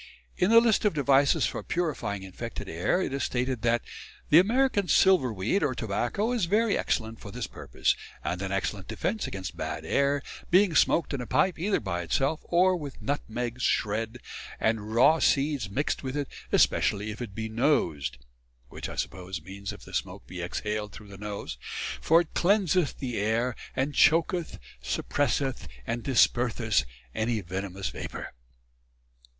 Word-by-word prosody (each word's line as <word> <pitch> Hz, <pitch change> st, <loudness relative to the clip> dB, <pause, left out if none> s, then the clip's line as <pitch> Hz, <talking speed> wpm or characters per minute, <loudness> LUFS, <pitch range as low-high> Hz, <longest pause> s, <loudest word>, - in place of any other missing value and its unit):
In 180 Hz, -, +2 dB
the 230 Hz, +1 st, +9 dB
list 230 Hz, -2 st, +3 dB
of 210 Hz, -6 st, +2 dB
devices 140 Hz, -1 st, +4 dB
for -, -, -3 dB
purifying 145 Hz, -, -2 dB
infected 105 Hz, +5 st, -7 dB
air 90 Hz, -, 0 dB
it 135 Hz, -, -3 dB
is 135 Hz, -2 st, -1 dB
stated 125 Hz, -1 st, -1 dB
that 120 Hz, 0 st, +2 dB, 0.5 s
"The 155 Hz, -, +9 dB
American 220 Hz, 0 st, +2 dB
Silver 180 Hz, -12 st, +4 dB
weed, 110 Hz, -, 0 dB
or 140 Hz, -4 st, 0 dB
Tobacco, 120 Hz, -, -1 dB
is 235 Hz, -7 st, +1 dB
very 210 Hz, +4 st, +2 dB
excellent 110 Hz, -1 st, -1 dB
for 105 Hz, -, -9 dB
this 120 Hz, +3 st, -4 dB
purpose, -, -, -1 dB, 0.3 s
and 85 Hz, +4 st, -2 dB
an 95 Hz, -1 st, -3 dB
excellent 95 Hz, -1 st, -2 dB
defence 215 Hz, +2 st, -2 dB
against 95 Hz, -1 st, -6 dB
bad -, -, -4 dB
air, 140 Hz, +1 st, +1 dB, 0.3 s
being 185 Hz, 0 st, +5 dB
smoked 165 Hz, -, +3 dB
in 135 Hz, -, -2 dB
a 120 Hz, -, -6 dB
pipe, 185 Hz, -3 st, +2 dB
either 195 Hz, +4 st, +1 dB
by 90 Hz, -4 st, -3 dB
itself, 135 Hz, -, 0 dB
or 185 Hz, +2 st, +4 dB
with 145 Hz, -6 st, -7 dB
Nutmegs 125 Hz, -3 st, -3 dB
shred, 110 Hz, +2 st, 0 dB, 0.4 s
and 110 Hz, -1 st, 0 dB
Rew 130 Hz, +8 st, +5 dB
Seeds 140 Hz, -6 st, +2 dB
mixed 140 Hz, +10 st, -1 dB
with 130 Hz, +1 st, -4 dB
it, 145 Hz, -2 st, -1 dB, 0.2 s
especially 105 Hz, +1 st, +2 dB
if 110 Hz, -, -8 dB
it 105 Hz, -5 st, -6 dB
be 110 Hz, 0 st, -3 dB
nosed" 110 Hz, -, +1 dB, 0.5 s
which, -, -, -6 dB
I -, -, -7 dB
suppose, 90 Hz, 0 st, -4 dB
means 100 Hz, +3 st, -6 dB
if -, -, -11 dB
the -, -, -13 dB
smoke -, -, -3 dB
be 90 Hz, 0 st, -7 dB
exhaled 105 Hz, +4 st, -3 dB
through 105 Hz, -1 st, -11 dB
the 100 Hz, -, -10 dB
nose 100 Hz, -10 st, -5 dB, 0.4 s
"for 165 Hz, +2 st, +5 dB
it 170 Hz, -, -8 dB
cleanseth 185 Hz, -4 st, +2 dB
the 125 Hz, -4 st, -4 dB
air, 110 Hz, +4 st, 0 dB, 0.2 s
and 135 Hz, +3 st, 0 dB
choaketh, 165 Hz, +2 st, +3 dB, 0.2 s
suppresseth 130 Hz, -, -1 dB, 0.2 s
and 120 Hz, +1 st, -2 dB
disperseth 115 Hz, -, +2 dB, 0.3 s
any 110 Hz, 0 st, 0 dB
venomous 95 Hz, +1 st, -4 dB
vapour." -, -, -7 dB
125 Hz, 165 wpm, -28 LUFS, 105-160 Hz, 0.5 s, the